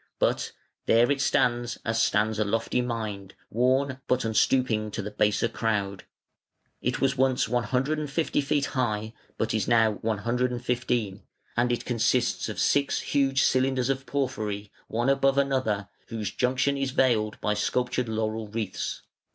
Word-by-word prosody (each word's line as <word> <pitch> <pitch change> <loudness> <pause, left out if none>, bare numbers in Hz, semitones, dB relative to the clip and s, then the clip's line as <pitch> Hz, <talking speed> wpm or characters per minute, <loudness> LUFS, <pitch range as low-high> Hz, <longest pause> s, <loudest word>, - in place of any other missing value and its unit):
But - - 0 0.4
"there 120 +3 +5
it 140 -1 +1
stands, 120 -3 +1
as 115 0 +1
stands 110 +1 +1
a - - +3
lofty 115 +4 0
mind, 110 -5 -4 0.2
Worn, 130 +3 +1
but 125 -1 +1
unstooping 110 -1 +2
to - - -2
the 105 - -5
baser 105 +1 +2
crowd". 100 -5 -2 0.8
It 125 +1 -1
was 135 0 +1
once 130 -2 +2
150 140 +6 0
feet 145 0 +1
high, 110 -5 -2 0.2
but 110 - -1
is 110 -3 0
now 115 -2 +4
115, 120 -1 -1 0.3
and 120 +1 +2
it 120 - -2
consists 120 0 +1
of 105 - -5
six 140 -1 +2
huge 135 -1 +2
cylinders 130 -1 +2
of 135 0 -4
porphyry, 105 -7 -2 0.2
one 120 +3 -1
above 135 0 +3
another, 130 -8 +1 0.2
whose 110 -4 -4
junction 130 +5 +1
is 135 -1 -1
veiled 115 -5 +1
by 105 - 0
sculptured 125 +3 -1
laurel 110 0 -2
wreaths. 105 -2 -4
120 Hz, 145 wpm, -27 LUFS, 110-130 Hz, 0.8 s, there